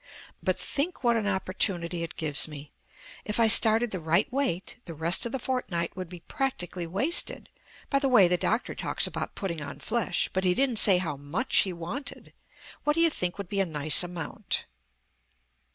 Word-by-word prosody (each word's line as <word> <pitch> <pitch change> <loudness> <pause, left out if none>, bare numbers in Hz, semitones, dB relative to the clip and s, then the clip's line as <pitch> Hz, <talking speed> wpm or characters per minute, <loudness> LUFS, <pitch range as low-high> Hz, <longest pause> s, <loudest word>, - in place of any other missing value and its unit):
"But - - 0
think 290 +2 -2
what 235 -1 +3
an 215 -3 0
opportunity 185 -3 0
it 165 - -6
gives 150 -2 +1
me. 145 -1 -10 0.5
If 210 +2 -2
I 230 - +5
started 225 +1 +6
the 185 - -3
right 165 +5 +2
weight, 260 -10 -1
the 165 - -8
rest 165 +8 +1
of - - -7
the 265 - -2
fortnight 235 -10 -3
would 185 -2 -6
be 175 -1 -10
practically 180 -9 -3
wasted. 230 - +1 0.4
By 275 - +4
the 275 -1 0
way, 215 -8 +6
the 180 - +2
doctor 225 +6 -1
talks - - -1
about - - -4
putting 170 -5 -4
on 140 - -7
flesh, 210 +3 -1
but 190 - -1
he 180 -1 +2
didn't 260 -4 +1
say 195 -3 +6
how 160 -6 -3
much 150 - 0
he 190 - +4
wanted. 180 - -7 0.5
What 295 0 +1
do - - 0
you 330 -1 +4
think 180 -9 -3
would 200 -2 -6
be 200 +2 -2
a 195 - +2
nice 150 -2 +3
amount?" 175 -2 -4
185 Hz, 190 wpm, -27 LUFS, 170-235 Hz, 0.5 s, started